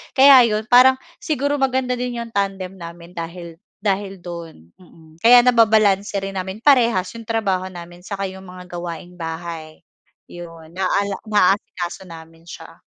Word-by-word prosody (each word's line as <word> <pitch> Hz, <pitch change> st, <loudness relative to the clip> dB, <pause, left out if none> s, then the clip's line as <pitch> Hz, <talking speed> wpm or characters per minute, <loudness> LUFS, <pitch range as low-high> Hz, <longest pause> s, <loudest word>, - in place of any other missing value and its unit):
kaya 265 Hz, -3 st, +8 dB
'yon 215 Hz, 0 st, -1 dB
parang 260 Hz, +2 st, +7 dB, 0.2 s
siguro 290 Hz, -2 st, -1 dB
maganda 255 Hz, -2 st, 0 dB
din 245 Hz, -1 st, -3 dB
yung 230 Hz, -, -12 dB
tandem 195 Hz, -2 st, -2 dB
namin 170 Hz, -1 st, -11 dB
dahil 170 Hz, -1 st, -8 dB, 0.2 s
dahil 195 Hz, -1 st, -1 dB
do'n, 165 Hz, -, -10 dB
mm. 160 Hz, -2 st, -20 dB
Kaya 240 Hz, +3 st, +7 dB
nababalanse 215 Hz, -5 st, +3 dB
rin 195 Hz, -1 st, -4 dB
namin 190 Hz, +4 st, -7 dB
parehas 235 Hz, -10 st, +3 dB
yung 230 Hz, -1 st, -11 dB
trabaho 195 Hz, -5 st, -1 dB
namin, 175 Hz, -1 st, -11 dB
saka 195 Hz, +2 st, -6 dB
'yong 190 Hz, 0 st, -12 dB
mga 180 Hz, -1 st, -12 dB
gawaing-bahay 170 Hz, -2 st, -7 dB, 0.5 s
yun, 165 Hz, -2 st, -11 dB
naala 195 Hz, +2 st, -1 dB
naasikaso 190 Hz, -3 st, 0 dB
namin 165 Hz, 0 st, -14 dB
siya. -, -, -12 dB
190 Hz, 140 wpm, -20 LUFS, 170-225 Hz, 0.5 s, kaya